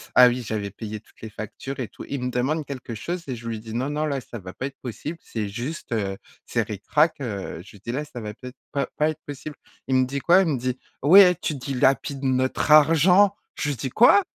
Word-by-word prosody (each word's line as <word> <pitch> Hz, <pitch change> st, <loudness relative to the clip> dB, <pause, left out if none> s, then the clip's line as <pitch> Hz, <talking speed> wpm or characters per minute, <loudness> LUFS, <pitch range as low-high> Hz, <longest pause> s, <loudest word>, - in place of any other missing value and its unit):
ah 125 Hz, -1 st, +9 dB
oui, 125 Hz, +1 st, 0 dB
j'avais 105 Hz, -2 st, -3 dB
payé 105 Hz, +1 st, -7 dB
toutes -, -, -25 dB
les 110 Hz, -, -6 dB
factures 110 Hz, +6 st, -7 dB
et 120 Hz, -, -2 dB
tout. -, -, -11 dB
Il 140 Hz, -2 st, -3 dB
me 125 Hz, -, 0 dB
demande 140 Hz, +5 st, 0 dB
quelque 130 Hz, -4 st, -6 dB
chose 170 Hz, +10 st, -4 dB
et 125 Hz, -3 st, -3 dB
je 115 Hz, 0 st, -9 dB
lui 110 Hz, -1 st, -3 dB
dis: 110 Hz, 0 st, -8 dB
«Non 130 Hz, +4 st, -1 dB
non, 150 Hz, +1 st, -1 dB
là, 140 Hz, -3 st, -1 dB
ça 120 Hz, 0 st, -9 dB
va 90 Hz, -2 st, -8 dB
pas 130 Hz, -, -5 dB
être 135 Hz, -1 st, -6 dB
possible, 145 Hz, +7 st, -5 dB
c'est 110 Hz, -3 st, -4 dB
juste, 120 Hz, +5 st, -5 dB
heu, 100 Hz, -3 st, -1 dB, 0.3 s
c'est -, -, 0 dB
ric-rac, 150 Hz, -, +1 dB
heu» 100 Hz, -8 st, -4 dB
je -, -, -14 dB
lui 100 Hz, -, -15 dB
dis: 115 Hz, +4 st, -5 dB
«Là, 150 Hz, +3 st, -1 dB
ça 145 Hz, -5 st, -9 dB
va 105 Hz, -1 st, -6 dB
pas 125 Hz, +3 st, -9 dB
être 125 Hz, -, -18 dB, 0.2 s
pas 140 Hz, -2 st, 0 dB
pas 150 Hz, +1 st, +3 dB
être 155 Hz, -1 st, -6 dB
possible». 145 Hz, +1 st, -7 dB, 0.3 s
Il 130 Hz, -, +1 dB
me 130 Hz, 0 st, +4 dB
dit 140 Hz, +2 st, -3 dB
quoi? 175 Hz, +8 st, +5 dB
Il 180 Hz, -, +1 dB
me 140 Hz, -, 0 dB
dit: 125 Hz, +1 st, -2 dB, 0.3 s
«Ouais, 180 Hz, +3 st, +8 dB
tu 155 Hz, -, -1 dB
dilapides 135 Hz, +1 st, 0 dB
notre 130 Hz, +3 st, +1 dB
argent». 165 Hz, +6 st, +6 dB, 0.2 s
Je 145 Hz, -, -2 dB
lui 140 Hz, -, -2 dB
dis: 130 Hz, -, -3 dB
«Quoi?» 245 Hz, -, +6 dB
130 Hz, 250 wpm, -24 LUFS, 115-150 Hz, 0.3 s, ah